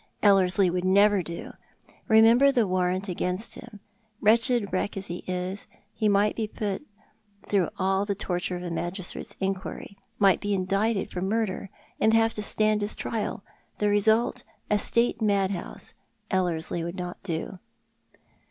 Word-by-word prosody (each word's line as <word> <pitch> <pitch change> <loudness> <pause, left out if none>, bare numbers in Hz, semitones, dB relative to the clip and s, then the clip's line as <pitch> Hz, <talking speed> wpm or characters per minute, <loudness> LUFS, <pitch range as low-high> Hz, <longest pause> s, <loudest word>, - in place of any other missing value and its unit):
"Ellerslie 190 -2 +4
would 180 0 -2
never 200 +1 +4
do. 170 -1 -7 0.6
Eemember 230 +5 +6
the 245 -5 +2
warrant 185 +1 0
against 180 +3 -2
him. 230 -4 -12 0.4
Wretched 230 -1 +2
wreck 190 +2 -1
as 195 - -5
he 175 -2 -6
is, 185 +2 -4 0.3
he 215 - +1
might 205 +1 +2
be 220 -2 -2
put 205 -2 -3 0.7
through 195 -5 +1
all 190 +1 +1
the 200 -1 -2
torture 180 -2 -3
of 180 - -6
a 175 - -4
magistrate's 175 +2 -3
inqiiiry 195 +1 -4
— - - -31
might 190 - +3
be 205 -1 0
indicted 195 +3 0
for 180 - -4
murder, 200 -1 -1 0.3
and 220 +1 +4
have 225 0 +3
to 210 - -1
stand 215 0 +2
his 205 +1 -1
trial 215 -3 -3 0.2
— - - -41
the 210 - +1
result, 220 +4 +2 0.3
a 210 - +3
State 235 +2 +1
mad 200 -2 +2
house. 180 -3 -7 0.4
Ellerslie 175 -2 -1
would 170 +2 -5
not 180 -1 -6
do." 175 0 -4
195 Hz, 160 wpm, -26 LUFS, 185-215 Hz, 0.7 s, Eemember